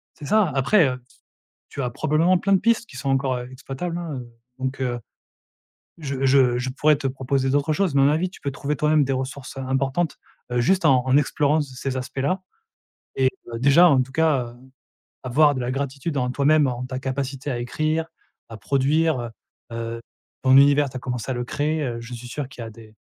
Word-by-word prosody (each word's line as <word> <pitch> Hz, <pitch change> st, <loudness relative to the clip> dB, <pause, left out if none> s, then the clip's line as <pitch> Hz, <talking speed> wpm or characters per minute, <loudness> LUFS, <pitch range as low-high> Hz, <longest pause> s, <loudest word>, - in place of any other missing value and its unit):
C'est 145 Hz, -, -10 dB
ça, 210 Hz, +3 st, +3 dB
après, 140 Hz, +5 st, +4 dB
heu, 125 Hz, -1 st, -4 dB
s -, -, -26 dB, 0.5 s
tu 140 Hz, -, -5 dB
as 125 Hz, -, -2 dB
probablement 155 Hz, +7 st, +2 dB
plein 195 Hz, +3 st, 0 dB
de 195 Hz, -, +6 dB
pistes 230 Hz, 0 st, +2 dB
qui 135 Hz, -, -13 dB
sont 135 Hz, +1 st, -4 dB
encore, 135 Hz, -1 st, +1 dB
heu, 125 Hz, 0 st, -6 dB
exploitables 140 Hz, +6 st, -5 dB
hein, 165 Hz, -4 st, -5 dB
heu, 120 Hz, -, -10 dB, 0.3 s
donc 130 Hz, +1 st, -3 dB
heu, 120 Hz, -2 st, -2 dB, 1.0 s
je 135 Hz, -3 st, -2 dB
je 130 Hz, -2 st, +4 dB
je 125 Hz, +1 st, -2 dB
pourrais 150 Hz, +3 st, +3 dB
te 140 Hz, -, -7 dB
proposer 135 Hz, 0 st, -1 dB
d'autres 145 Hz, +2 st, +1 dB
choses 185 Hz, -1 st, 0 dB
mais 140 Hz, -, +4 dB
à -, -, +5 dB
mon 140 Hz, -, +5 dB
avis, 170 Hz, +4 st, 0 dB
tu -, -, -15 dB
peux 140 Hz, -, -2 dB
trouver 145 Hz, +2 st, -3 dB
toi-même 150 Hz, +1 st, +3 dB
des 135 Hz, 0 st, -1 dB
ressources, 130 Hz, +1 st, -5 dB
heu, -, -, -4 dB
importantes, 135 Hz, +5 st, -1 dB, 0.3 s
heu, 125 Hz, -, +1 dB
juste 190 Hz, +10 st, +2 dB
en 130 Hz, -2 st, +4 dB
en 130 Hz, +1 st, +4 dB
explorant 150 Hz, +2 st, +2 dB
c 135 Hz, -3 st, -7 dB
ces 130 Hz, +1 st, -3 dB
aspects-là 135 Hz, +8 st, -2 dB, 0.7 s
et 130 Hz, -1 st, +3 dB, 0.2 s
bah, 115 Hz, -1 st, -6 dB
déjà, 140 Hz, +7 st, +6 dB
en 135 Hz, -4 st, +4 dB
tout 130 Hz, +1 st, -5 dB
cas, 150 Hz, -5 st, +2 dB
heu, -, -, -17 dB, 0.7 s
avoir 145 Hz, +4 st, +3 dB
de 130 Hz, -, -3 dB
la 125 Hz, +1 st, -2 dB
gratitude 140 Hz, +3 st, -3 dB
en 125 Hz, -1 st, 0 dB
toi-même. 145 Hz, +2 st, +3 dB
En 125 Hz, 0 st, -3 dB
ta 130 Hz, 0 st, -5 dB
capacité 135 Hz, +1 st, -3 dB
à 120 Hz, -, -2 dB
écrire, 155 Hz, +6 st, -1 dB, 0.4 s
à 115 Hz, -, -9 dB
produire 140 Hz, +5 st, +1 dB, 0.5 s
heu, -, -, -6 dB
heu, 115 Hz, 0 st, -4 dB, 0.4 s
ton 130 Hz, 0 st, +5 dB
univers, 140 Hz, +1 st, +5 dB
tu 130 Hz, -, -9 dB
as -, -, -5 dB
commencé 125 Hz, -1 st, -4 dB
à 130 Hz, -, 0 dB
le 120 Hz, -, -3 dB
créer, 150 Hz, +4 st, -1 dB
heu, 120 Hz, -3 st, -3 dB
je 120 Hz, +1 st, -8 dB
suis 120 Hz, +1 st, -9 dB
sûr 135 Hz, +1 st, -5 dB
qu'il 125 Hz, -, -10 dB
y -, -, -6 dB
a 115 Hz, -, -8 dB
des 110 Hz, 0 st, -15 dB
135 Hz, 225 wpm, -23 LUFS, 130-150 Hz, 1.0 s, de